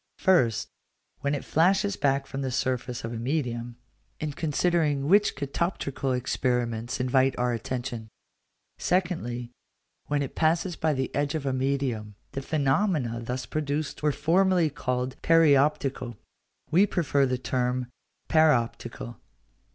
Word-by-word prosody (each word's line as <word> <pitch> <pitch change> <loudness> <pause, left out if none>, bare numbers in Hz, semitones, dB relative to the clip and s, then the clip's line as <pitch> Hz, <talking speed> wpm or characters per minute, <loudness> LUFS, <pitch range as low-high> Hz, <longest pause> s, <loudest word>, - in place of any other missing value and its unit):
First, 130 - +3 0.5
when 140 +1 0
it 140 - -5
flashes 195 +5 +2
back 135 -1 +1
from 135 - -5
the 135 - -1
surface 125 -1 -2
of 115 +1 -4
a - - -4
medium; 120 -2 -2 0.4
in 155 -2 -3
considering 150 -2 +1
which 205 +5 +4
catoptrical 140 -2 -2
experiments 125 -1 -1
invite 130 +1 +2
our 125 0 +1
attention. 120 0 -4 0.7
Secondly, 125 -10 -1 0.6
when 145 -1 0
it 135 - -6
passes 165 +2 +1
by 155 -1 +1
the 130 -2 -2
edge 145 +1 0
of 150 -3 -3
a 135 - 0
medium: 130 -6 -1 0.2
the 135 - -4
phenomena 140 - +1
thus 125 +2 -4
produced 150 0 -3
were 150 0 +2
formerly 170 +3 +2
called 125 -2 -3
perioptical; 140 -6 +3 0.5
we 190 +6 +5
prefer 145 -7 +1
the 125 0 0
term 125 0 -1 0.4
paroptical. 130 - +1
135 Hz, 130 wpm, -27 LUFS, 125-155 Hz, 0.7 s, we